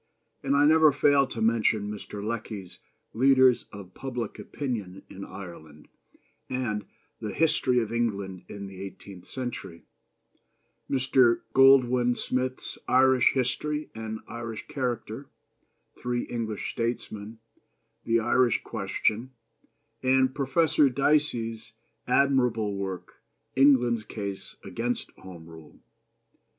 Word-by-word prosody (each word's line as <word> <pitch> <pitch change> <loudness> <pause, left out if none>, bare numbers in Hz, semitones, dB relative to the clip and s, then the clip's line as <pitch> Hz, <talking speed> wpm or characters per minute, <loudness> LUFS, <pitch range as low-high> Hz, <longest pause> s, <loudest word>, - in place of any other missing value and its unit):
and 140 +1 +1
I 145 +1 +5
never 155 0 +6
fail 140 0 +3
to 115 - -6
mention 110 -2 +2
Mr. 105 0 -7
Lecky's 105 -5 -5 0.3
Leaders 130 0 +4
of 95 -3 -11
Public 125 -5 -5
Opinion 105 -9 -5
in 100 - -8
Ireland 80 -7 -11 0.6
and 120 -5 -2 0.3
the 105 - -4
History 145 -5 +2
of 115 -1 -3
England 100 -6 -2
in 100 -1 -7
the 95 -1 -9
Eighteenth 95 -1 -10
Century; 120 -10 -6 1.1
Mr. 130 -3 +3
Goldwin 125 -2 +5
Smith's 130 0 -3
Irish 130 0 +5
History 150 +4 -1
and 110 0 -6
Irish 115 -2 -6
Character, 125 0 -4 0.7
Three 120 0 -1
English 110 -3 -4
Statesmen, 115 -2 -4 0.7
The 115 0 +2
Irish 120 +1 +2
Question, 120 +5 -2 0.7
and 130 0 +3
Professor 145 +1 +3
Dicey's 120 -5 0 0.3
admirable 125 -6 +2
work, 95 -2 -6 0.3
England's 125 -4 +4
Case 100 -3 -6
against 120 +1 -3
Home 85 -3 -11
Rule. 80 -2 -14
120 Hz, 105 wpm, -27 LUFS, 105-130 Hz, 1.1 s, never